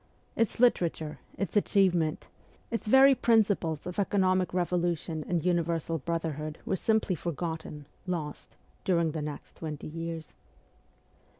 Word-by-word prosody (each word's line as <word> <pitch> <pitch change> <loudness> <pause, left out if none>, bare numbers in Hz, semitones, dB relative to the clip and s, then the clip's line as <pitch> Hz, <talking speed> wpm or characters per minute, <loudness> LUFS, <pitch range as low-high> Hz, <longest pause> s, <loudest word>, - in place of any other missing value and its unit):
Its 230 -1 0
litera 235 -8 +5
ture, 155 -1 -8 0.2
its 195 -2 -3
achievements, 185 -6 +2 0.5
its 230 -2 -3
very 265 +4 +8
principles 205 - +2
of 180 +2 -4
economic 185 -2 +2
84 185 - -3
MEMOIRS 175 - -1
OF - - -7
A - - +4
REVOLUTIONIST 175 -2 -1
revolution 155 -1 -4
and 175 -2 0
universal 170 -2 +1
brotherhood 155 -1 -3
were - - 0
simply 220 -1 +1
for 170 0 -3
gotten, 160 -2 -5 0.2
lost, 160 -5 -4 0.3
during 170 -3 +2
the 155 0 -3
next 150 -1 -7
twenty 155 -3 -6
years. 165 0 -6
170 Hz, 155 wpm, -29 LUFS, 160-190 Hz, 0.5 s, very